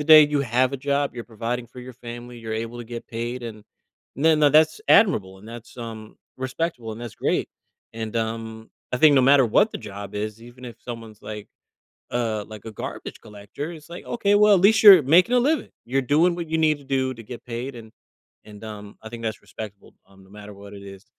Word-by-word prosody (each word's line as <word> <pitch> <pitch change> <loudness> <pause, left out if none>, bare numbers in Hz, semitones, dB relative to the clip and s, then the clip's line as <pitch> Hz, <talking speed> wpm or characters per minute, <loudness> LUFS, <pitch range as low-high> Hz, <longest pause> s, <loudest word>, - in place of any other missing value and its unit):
the 160 - +7
day, 155 -1 +10
you 145 -1 0
have 130 +1 +1
a - - -2
job, 140 0 -1
you're 120 - -5
providing 120 +2 -4
for 125 +2 -14
your 130 +1 -10
family, 120 0 -9
you're 110 -1 -6
able 115 +2 -5
to 120 - -7
get 115 0 -8
paid 120 +2 -5
and 110 -3 -8 0.5
the 160 +4 +4
no 150 -1 +5
that's 155 - +4
admirable 95 - +4
and 105 - -14
that's, 120 +1 -11
um, 110 -3 -8 0.2
respectable 130 -3 -3
and 110 - -9
that's 120 -2 -7
great. - - -1 0.4
And, 110 0 -5
um, 110 0 -4 0.2
I - - +1
think 150 +3 +6
no 135 - +6
matter 135 +1 +6
what 205 - +3
the - - -6
job 100 -2 -9
is, 105 +1 -4
even 120 +2 -13
if 120 -3 -9
someone's 115 -3 -9
like 105 -1 -8 0.6
uh, 115 -3 -1
like 110 -1 -11
a 110 - -6
garbage 105 - -7
collector, 105 +9 -8
it's 155 -3 -12
like, 175 - -8
"Okay, 205 -4 0
well, 210 0 +6
at 180 - +2
least 220 +2 +5
you're 195 -7 +10
making 180 - +5
a - - +5
living. 295 +6 +1 0.2
You're 135 +3 0
doing 155 +7 +3
what 170 -1 -5
you 160 - 0
need 155 -2 +2
to - - -16
do 130 -1 -1
to 115 - -11
get 120 +3 -10
paid," 125 +2 -5
and 110 -2 -11 0.5
and, 105 0 -13
um, 105 -2 -9
I 110 - -8
think 115 0 -8
that's 110 0 -3
respectable, 105 -2 -10
um, 95 -1 -20
no 95 - -20
matter 105 0 -11
what 100 0 -12
it 100 - -10
is. 100 +1 -12
120 Hz, 225 wpm, -24 LUFS, 110-145 Hz, 0.6 s, day